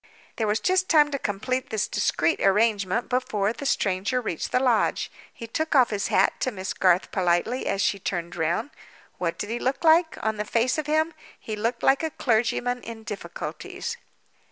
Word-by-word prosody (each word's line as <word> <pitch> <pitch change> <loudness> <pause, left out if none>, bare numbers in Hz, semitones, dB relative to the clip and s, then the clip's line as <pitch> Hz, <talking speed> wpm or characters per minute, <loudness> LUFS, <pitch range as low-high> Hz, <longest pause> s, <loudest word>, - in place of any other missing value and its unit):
There 220 - 0
was 210 +1 +1
just 370 - +1
time 300 -2 +5
to 280 - -2
complete 255 +5 -2
this 220 -1 -1
discreet 330 - +1
arrangement, 205 +1 +2
before 220 -5 0
the 280 +2 -5
stranger 200 +3 0
reached 215 -9 -4
the - - +3
lodge. 245 -4 +1 0.2
He 230 - -9
took 315 +7 -2
off 255 -4 +5
his 200 -2 -1
hat 190 - +3
to - - 0
Miss 190 -3 -4
Garth 185 -1 +2
politely, 185 +7 0
as 195 +1 0
she 200 +1 +1
turned 175 -2 -3
round. 170 - -1 0.5
What 170 -2 -1
did 205 - -4
he 240 - -2
look 260 +5 -1
like, 320 +1 +4
on 220 -1 0
the 210 - -1
face 235 +6 +1
of 300 - -4
him? 315 +2 +1 0.3
He 215 - -5
looked 230 +3 -2
like 270 0 +4
a 320 - -1
clergyman 245 -1 0
in 225 -1 -9
difficulties. 455 - -6
230 Hz, 185 wpm, -25 LUFS, 200-265 Hz, 0.5 s, time